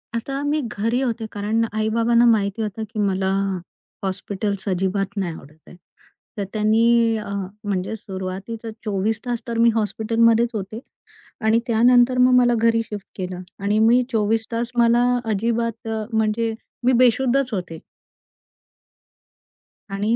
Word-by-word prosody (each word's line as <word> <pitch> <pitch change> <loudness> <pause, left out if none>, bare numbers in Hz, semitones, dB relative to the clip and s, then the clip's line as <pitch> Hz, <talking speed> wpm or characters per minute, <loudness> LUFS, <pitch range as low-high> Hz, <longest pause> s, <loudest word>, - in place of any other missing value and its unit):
आता 270 +4 -3
मी 295 +1 0
घरी 230 +4 0
होते. 235 -3 -2
कारण 215 +3 0
आई-बाबांना 230 +2 +2
माहिती 215 -2 +2
होतं, 215 +1 -3
की 215 0 -7
मला 190 -1 +1 0.7
हॉस्पिटल्स 195 +1 -3
अजिबात 195 +2 -1
नाही 180 -4 -1
आवडत 150 0 -14
आहे. - - -13 0.6
तर 200 - -1
त्यांनी 225 +2 +3
अ, 210 -2 -6 0.3
म्हणजे 200 0 -2
सुरुवातीचा 195 +3 -6 0.2
24 210 +2 0
तास 240 -1 -2
तर 230 -1 -3
मी 230 0 +5
हॉस्पिटलमध्येच 230 +2 +2
होते. 210 +1 -5 0.6
आणि 220 +1 +3
त्यानंतर 245 +2 +4
मग 250 0 +5
मला 240 -1 +4
घरी 230 0 +3
शिफ्ट 205 -2 -8
केलं 180 -1 -5 0.2
आणि 205 +2 0
मी 235 +3 +5
24 220 +1 +1
तास 235 +1 -2
मला 235 +1 +4 0.3
अजिबात 230 +2 -1
अ, 220 -1 -2
म्हणजे 220 +1 0 0.3
मी 255 - +4
बेशुद्धच 255 +1 +2
होते. 175 -4 -4 2.1
आणि 205 +4 0
220 Hz, 135 wpm, -22 LUFS, 200-235 Hz, 2.1 s, मी